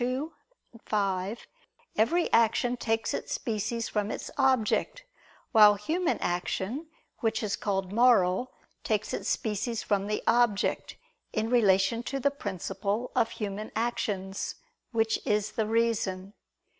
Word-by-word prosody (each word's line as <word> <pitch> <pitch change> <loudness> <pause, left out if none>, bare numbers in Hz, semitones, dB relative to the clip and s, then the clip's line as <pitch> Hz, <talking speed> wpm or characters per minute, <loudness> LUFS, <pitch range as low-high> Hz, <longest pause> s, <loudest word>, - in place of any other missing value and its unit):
2, 260 +6 -2 0.5
5), 200 0 -1 0.5
every 335 +11 +2
action 230 +2 +3
takes 225 -2 -1
its - - -3
species 225 +1 -2
from 210 -1 -1
its - - -5
object; 265 - +1 0.5
while 210 -3 +8
human 320 - 0
action, 190 - -2 0.3
which 220 -1 0
is 205 -2 0
called 195 -2 -2
moral, 235 -2 +4 0.3
takes 215 0 -1
its - - -2
species 220 +1 -1
from 200 -1 0
the 210 - -2
object, 230 -3 +2 0.4
in 220 +2 -1
relation 205 -1 +3
to 275 +3 -3
the 280 +1 +2
principle 205 -1 -3
of 225 - +3
human 210 0 -5
actions, 215 -4 -2 0.4
which 225 -1 +1
is 210 0 0
the 215 0 -1
reason. 215 -4 0
220 Hz, 125 wpm, -28 LUFS, 200-240 Hz, 0.5 s, while